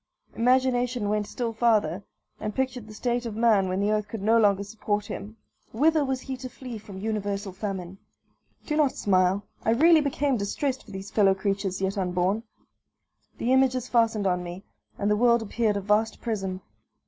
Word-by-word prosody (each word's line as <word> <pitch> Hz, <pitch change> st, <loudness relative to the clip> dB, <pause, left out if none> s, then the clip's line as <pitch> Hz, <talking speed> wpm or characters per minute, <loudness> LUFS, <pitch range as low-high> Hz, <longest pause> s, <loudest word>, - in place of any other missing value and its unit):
Imagination 245 Hz, -2 st, +2 dB
went 210 Hz, -1 st, 0 dB
still 235 Hz, -2 st, -3 dB
farther, 215 Hz, -6 st, +2 dB, 0.4 s
and 210 Hz, -1 st, -4 dB
pictured 255 Hz, -4 st, -2 dB
the 215 Hz, -, -10 dB
state 240 Hz, +1 st, -1 dB
of 220 Hz, -, -6 dB
man 220 Hz, -4 st, +3 dB
when 185 Hz, +1 st, -1 dB
the 205 Hz, +1 st, +1 dB
earth 210 Hz, -1 st, 0 dB
could 210 Hz, -1 st, -6 dB
no 225 Hz, +2 st, +4 dB
longer 200 Hz, -2 st, +3 dB
support 205 Hz, 0 st, -2 dB
him. 210 Hz, +2 st, -7 dB, 0.4 s
Whither 305 Hz, +6 st, +3 dB
was 265 Hz, -2 st, -2 dB
he 265 Hz, -, -5 dB
to 255 Hz, 0 st, -7 dB
flee 250 Hz, -3 st, -8 dB
from 200 Hz, -2 st, -11 dB
universal 205 Hz, -1 st, -3 dB
famine? 190 Hz, -2 st, -5 dB, 0.7 s
Do 300 Hz, -, -1 dB
not 300 Hz, -3 st, +3 dB
smile; 185 Hz, 0 st, +2 dB, 0.2 s
I -, -, 0 dB
really 320 Hz, +5 st, +6 dB
became 280 Hz, -2 st, 0 dB
distressed 255 Hz, +6 st, -2 dB
for -, -, -16 dB
these 195 Hz, +1 st, -7 dB
fellow 195 Hz, -3 st, +4 dB
creatures 195 Hz, -1 st, -2 dB
yet 195 Hz, +1 st, -1 dB
unborn. 180 Hz, +3 st, 0 dB, 1.0 s
The 245 Hz, +2 st, +1 dB
images 255 Hz, -2 st, +2 dB
fastened 225 Hz, -3 st, +2 dB
on 180 Hz, -1 st, +1 dB
me, 175 Hz, +2 st, -7 dB, 0.3 s
and 205 Hz, +1 st, 0 dB
the -, -, +4 dB
world 235 Hz, +1 st, +3 dB
appeared 220 Hz, -1 st, 0 dB
a -, -, -2 dB
vast 210 Hz, +3 st, +1 dB
prison. 195 Hz, -5 st, -3 dB
215 Hz, 180 wpm, -26 LUFS, 200-245 Hz, 1.0 s, really